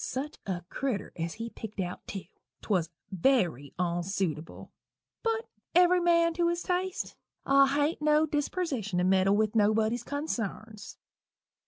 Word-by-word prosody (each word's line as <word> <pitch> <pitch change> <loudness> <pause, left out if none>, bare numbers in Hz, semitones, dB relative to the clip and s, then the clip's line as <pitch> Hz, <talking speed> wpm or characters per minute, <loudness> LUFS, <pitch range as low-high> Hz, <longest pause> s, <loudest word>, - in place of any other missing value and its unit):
Such 285 +4 -4
a 180 -2 -2
critter 250 -1 -3
as 165 -1 -3
he 230 +1 -5
pickt 215 -2 -8
out, 180 -1 -4
tew! 195 - -5 0.4
'twas 180 -6 +1 0.2
very 175 - +1
onsuitable 175 -2 -2 0.5
but 455 0 -1 0.3
every 360 0 +6
man 335 -1 +4
to 340 +1 +1
his 345 0 -1
taste 365 0 -2 0.3
I 275 0 +6
hain't 290 +3 +1
no 300 +1 +4
dispersition 290 - -2
to 180 - +2
meddle 190 +1 +4
with 215 -1 +1
nobody's 220 +2 +2
consarns. 225 -7 -4
230 Hz, 135 wpm, -29 LUFS, 190-310 Hz, 0.5 s, every